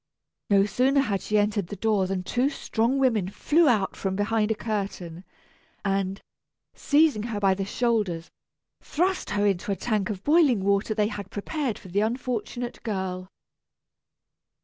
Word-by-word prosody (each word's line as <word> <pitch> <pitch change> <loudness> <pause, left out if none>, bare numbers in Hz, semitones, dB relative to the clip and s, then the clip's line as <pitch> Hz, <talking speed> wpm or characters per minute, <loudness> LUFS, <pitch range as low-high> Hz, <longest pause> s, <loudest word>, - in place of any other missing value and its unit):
No 200 -1 +5
sooner 260 +7 +2
had 205 -7 -1
she 210 - 0
entered 205 -3 +1
the 205 - -6
door 205 -1 +1
than 185 -1 -2
two 250 +8 +1
strong 245 -2 -1
women 225 -9 +2
flew 310 - +3
out 210 -5 +1
from 190 -1 -2
behind 210 +1 +1
a 220 - +1
curtain, 195 -6 -4 0.6
and, 195 0 0 0.5
seizing 295 -6 +3
her 210 -3 -2
by 195 -1 +3
the 195 0 -3
shoulders, 205 -7 -1 0.5
thrust 365 +4 -1
her 205 0 +1
into 200 0 0
a - - +1
tank 210 -3 -1
of 200 -2 -5
boiling 290 - +4
water 200 +2 +1
they 210 -1 +1
had 200 -4 -6
prepared 260 +3 -3
for 190 - -13
the 200 +4 +1
unfortunate 240 +1 -3
girl. 190 -3 -3
210 Hz, 155 wpm, -26 LUFS, 195-240 Hz, 0.6 s, No